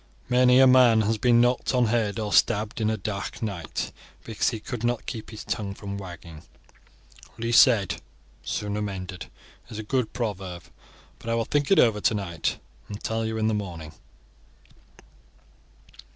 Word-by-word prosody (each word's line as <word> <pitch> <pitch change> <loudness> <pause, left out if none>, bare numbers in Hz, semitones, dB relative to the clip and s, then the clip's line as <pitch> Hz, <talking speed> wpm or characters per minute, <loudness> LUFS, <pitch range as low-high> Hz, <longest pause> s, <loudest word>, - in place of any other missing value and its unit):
Many 125 0 +5
a 135 - +8
man 125 -3 +6
has 110 +1 0
been 120 -1 +4
knocked 125 +1 +1
on 125 -1 +4
head 110 -2 0
or 105 -2 -3
stabbed 110 0 +2
on 110 - +2
a 110 - -1
dark 100 +2 -5
night, 90 -8 -4 0.3
because 110 -2 0
he 115 - -5
could 120 +1 -6
not 120 -1 -1
keep 110 - -6
his 110 - -8
tongue 100 -3 -3
from 100 -1 -6
wagging. 85 -4 -10 1.0
'Least 115 +1 +5
said, 110 -8 +4 0.5
the - - -20
sooner 105 0 -2
mended,' 95 -3 -5 0.4
is 110 - -8
a 110 - -4
good 125 +1 -1
proverb; 95 -7 -4 0.6
but 115 - -7
I 115 - +1
will 115 -1 0
think 145 +3 0
it 195 - +5
over 110 -3 +4
tonight, 95 -7 -1 0.3
and 105 0 -6
tell 115 0 -1
you 110 0 -3
in 110 0 +1
the 110 - +1
morning." 85 -7 -5
110 Hz, 165 wpm, -25 LUFS, 100-120 Hz, 1.0 s, a